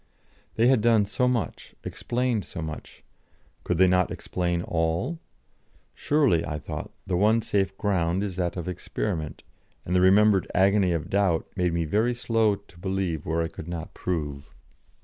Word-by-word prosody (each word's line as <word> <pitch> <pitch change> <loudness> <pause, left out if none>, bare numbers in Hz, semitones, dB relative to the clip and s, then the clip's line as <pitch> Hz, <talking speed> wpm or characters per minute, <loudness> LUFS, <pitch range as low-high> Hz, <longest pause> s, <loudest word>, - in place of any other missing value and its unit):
They 115 - +3
had 125 -3 +4
done 115 -2 +4
so 125 +5 0
much, 125 -3 -2
explained 120 -3 -1
so - - -8
much, 80 -1 -8 0.6
could - - -1
they 95 +1 +6
not 90 -1 +3
explain 85 -1 -2
all? 85 - -1 0.7
Surely, 140 - +2
I 75 0 -3
thought, 75 - -6 0.2
the 90 - -1
one 110 +5 +3
safe 95 -2 0
ground 95 -2 0
is 95 -3 -4
that 90 -1 -2
of 85 - -4
experiment, 85 -2 -4 0.4
and 90 - -1
the 90 - +4
remembered 100 +1 +5
agony 95 -1 +4
of 85 -3 -3
doubt 95 -5 +2
made 90 -2 +1
me 85 -1 0
very 110 +9 +1
slow 115 -3 +2
to 100 -3 -18
believe 95 -4 -2
where 80 +1 +1
I - - -1
could 80 -1 -9
not 85 -1 -6
prove. 75 -5 -4
95 Hz, 165 wpm, -26 LUFS, 85-105 Hz, 0.7 s, they